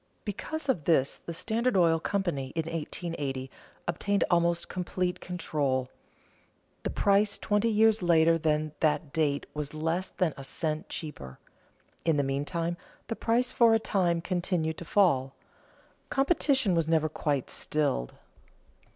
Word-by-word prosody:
Because 290 +9 -4
of 210 - 0
this, 140 -5 +2
the - - -3
Standard 225 +6 0
Oil 165 -2 +4
Co., 200 - -1
in 175 - +1
1880, 150 -1 -4 0.4
obtained 200 +4 +1
almost 170 0 +2
complete 180 0 -2
control. 145 -7 -1 0.9
The - - -2
price 205 +1 +2
twenty 210 +2 +1
years 220 0 +4
later 165 -1 +4
than 155 -1 0
that 155 -2 +1
date 145 -3 +1
was 150 0 -5
less 165 +4 -1
than 175 -5 0
a 135 - -7
cent 155 +2 -3
cheaper. 70 - -7 0.7
In 165 -3 +2
the 145 - +2
meantime 165 +5 -2 0.3
the 225 - -1
price 235 +3 +1
for 230 -2 +5
a - - +3
time 175 -6 +1
continued 175 -3 -1
to 170 - -7
fall. 140 -9 +2 0.7
Competition 270 - +2
was 165 -2 +1
never 160 -1 +3
quite 145 -3 -2
stilled. 140 - -1
165 Hz, 135 wpm, -29 LUFS, 150-195 Hz, 0.9 s, for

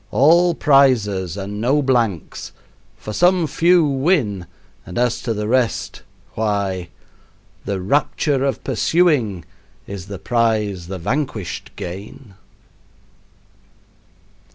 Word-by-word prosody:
all 170 +5 +4
prizes 110 - +3
and 100 +1 -5
no 135 +6 +2
blanks; 120 - -1 0.4
for 105 - -7
some 180 - +3
few 170 +2 +3
win, 135 - 0 0.4
and 90 - -8
as 120 -1 +1
to 120 - -3
the 105 -1 -2
rest, 125 -1 0 0.3
why 100 -5 -2 0.8
"The 100 -1 -2
rapture 140 - 0
of 135 -1 -1
pursuing 130 - +1 0.4
Is 100 -2 -8
the 100 -1 -6
prize 105 -5 0
the 95 +1 -5
vanquished 110 - -3
gain." 100 +5 -8
115 Hz, 105 wpm, -20 LUFS, 100-140 Hz, 0.8 s, all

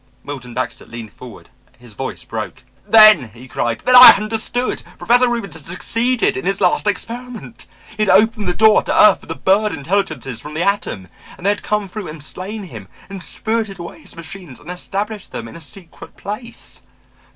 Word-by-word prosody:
Milton 130 -4 -8
Baxter 130 - -4
leaned 115 -2 -9
forward, 125 -2 -13 0.3
his 120 -2 -12
voice - - -6
broke. - - -6 0.2
"Then," 215 - +7
he 125 +2 -13
cried, 115 -2 -2
"then 250 - +3
I 250 0 +12
understood! 225 +4 -2 0.2
Professor 245 +1 +3
Reubens 235 -4 -3
had - - -9
succeeded 230 +7 0
in 130 - -4
his 195 +1 -1
last 185 +2 +1
experiment. 235 +3 -5 0.3
He 215 - -4
had - - -2
opened 220 -1 +3
the 180 - -1
door 220 0 +5
to - - -1
earth 210 - +7
for - - -16
the 165 - -4
bird 205 +4 +2
intelligences 145 - -2
from 150 +3 -9
the 165 - -1
atom 190 - -1 0.3
and 180 - -12
they 200 - +4
had 205 - -3
come 210 -1 -1
through 200 +1 -7
and 155 -1 -8
slain 200 +7 -7
him 115 - -10 0.2
and 195 -2 -7
spirited 220 +1 -2
away 170 -1 -9
his - - -13
machines 165 -3 -10
and 170 - -9
established 200 +3 -5
them 115 - -6
in - - -12
a 170 - -10
secret 170 +2 -12
place! 215 +4 -8
195 Hz, 190 wpm, -18 LUFS, 150-215 Hz, 0.3 s, I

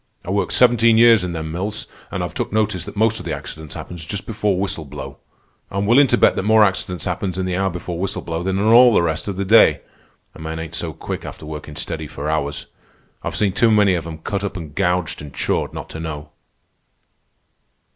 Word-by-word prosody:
I 90 - -3
worked 100 +1 0
seventeen 115 -2 +5
years 115 -3 +6
in 90 -1 -3
them 80 -1 -4
mills, 100 +6 -3 0.2
an' - - -3
I've - - -4
took - - -3
notice 105 -4 0
that - - -9
most 110 +1 +2
of - - -8
the 80 - -2
accidents 75 +1 -8
happens 85 -2 -7
just 100 +6 -4
before 105 -3 0
whistle 95 -4 -1
blow. 75 0 -8 0.5
I'm 100 +1 -2
willin' 130 +6 +6
to - - +2
bet - - +4
that - - +1
more 110 +2 +5
accidents 90 -3 -1
happens 95 -2 -2
in 95 - -1
the 90 -1 -1
hour 95 +1 +1
before 85 -1 -5
whistle 95 +1 -2
blow 80 0 -3
than 95 +1 -1
in 100 - 0
all 120 +1 +7
the - - +4
rest 80 +1 -2
of 100 -2 -3
the 100 - -1
day. 110 +4 +6 0.5
A - - -14
man 80 0 -5
ain't 80 0 -6
so 80 0 -3
quick - - -6
after - - -8
workin' 75 -1 -7
steady - - -4
for 75 +2 -4
hours. 70 -2 -2 0.6
I've - - -4
seen 100 -3 +1
too 115 - +4
many 105 -3 +4
of 85 -2 -2
'em 80 -1 -6
cut 100 +5 -3
up 100 -1 -3
an' 80 -4 -7
gouged 90 -1 0
an' 75 -2 -10
chawed - - -1
not - - -7
to 80 - -7
know." 75 -2 -6
90 Hz, 225 wpm, -20 LUFS, 80-105 Hz, 0.6 s, all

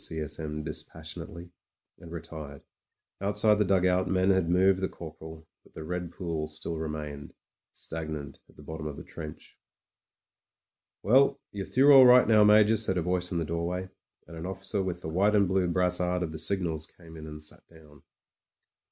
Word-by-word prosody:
S. 80 -1 -5
M. 75 -1 -4
dispassionately, 80 +2 -8 0.5
and 85 - -12
re 85 -2 -5
tired. 75 -4 -9 0.6
Outside 105 +1 +2
the - - +4
dugout 90 -1 +2
men 95 0 +2
had 95 -3 +1
moved 95 +2 +3
the 95 - -1
cor 80 -2 -9
poral; 80 0 -11 0.2
but - - -24
the 80 - -7
red 90 +1 -4
pools 80 -4 -4
still 80 +2 -4
remained 75 -2 -6 0.2
— - - -65
stagnant 80 -4 -6
at - - -22
the - - -14
bottom 80 -1 -6
of 75 - -7
the - - -8
trench.... 75 -2 -10 1.4
"Well, 130 +6 +4
you're 100 -1 -5
through 140 +3 +5
all 130 -2 +9
right 125 -1 +7
now. 110 -1 +6
Major," 105 +1 +5
said 100 -4 +3
a 85 - 0
voice 90 0 -1
in 90 - -1
the 85 - -1
doorway, 85 +3 -3 0.4
and 85 - -12
an 80 +2 -6
officer 95 +2 -3
with 90 -2 -4
the - - -4
white 100 +6 +2
and 100 -2 +4
blue 95 0 +1
brassard 90 0 +1
of 80 - -4
the 80 - -5
signals 80 -2 +1
came 80 -2 -15
in 80 -1 -9
and 75 0 -7
sat - - -7
down. 75 -3 -18
85 Hz, 185 wpm, -28 LUFS, 80-95 Hz, 1.4 s, all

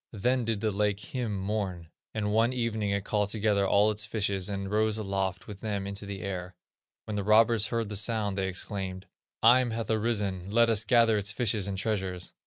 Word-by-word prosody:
Then 125 +4 0
did 110 -3 -1
the 110 -1 +1
lake 105 0 0 0.2
Eim 125 -3 -2
mourn, 95 -4 -3 0.2
and 105 -1 -2
one 115 +3 +3
evening 115 -4 -1
it 100 0 -1
called 105 -1 0
together 105 -2 +1
all 105 +2 +4
its 105 0 -1
fishes, 100 -4 -1
and 100 -1 -4
rose 110 0 +1
aloft 95 -3 -2
with 105 -2 -9
them 100 -3 -2
into 100 +1 -4
the 100 -1 -6
air. 90 -2 -5 0.5
When 110 - -4
the 100 - -1
robbers 110 +1 +4
heard 115 -3 -2
the 105 - -5
sound, 105 -1 0
they 95 -1 -1
exclaimed: 95 0 -4 0.4
'Eim 120 +1 +5
hath 115 0 -3
arisen; 105 -4 -1
let 115 +2 +4
us 110 -1 +2
gather 115 -4 +4
its 100 +1 +1
fishes 110 -4 0
and 100 -1 -3
treasures. 95 -3 -2
105 Hz, 195 wpm, -28 LUFS, 100-110 Hz, 0.5 s, Eim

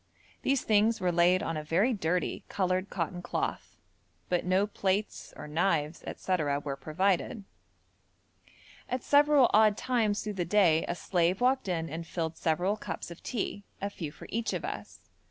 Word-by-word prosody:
These 275 -1 +1
things 220 +1 +3
were 180 -1 +1
laid 175 +3 +4
on 165 -1 -2
a 155 - -4
very 185 +11 +2
dirty 180 -3 -1
coloured 185 0 0
cotton 175 0 -3
cloth, - - -3 0.5
but 180 -1 +1
no 185 +2 +3
plates 200 0 -2
or - - -7
knives, 160 -1 0
&c. 185 - 0 0.3
were 140 -2 -3
provided. 185 - 0 1.5
At 255 0 -2
several 290 -2 +5
odd 215 -1 +5
times 225 -5 0
through 210 - -3
the - - +2
day 170 -3 +3
a 175 - -2
slave 175 +2 +1
walked 260 -1 +2
in 165 -3 -1
and 165 +2 -6
filled 165 -2 -3
several 175 +7 0
cups - - -6
of 170 - -10
tea, 205 -4 -3 0.2
a 200 +1 -3
few 160 -7 -6
for - - -12
each 230 +1 -1
of - - -3
us. - - -7
185 Hz, 165 wpm, -30 LUFS, 165-210 Hz, 1.5 s, several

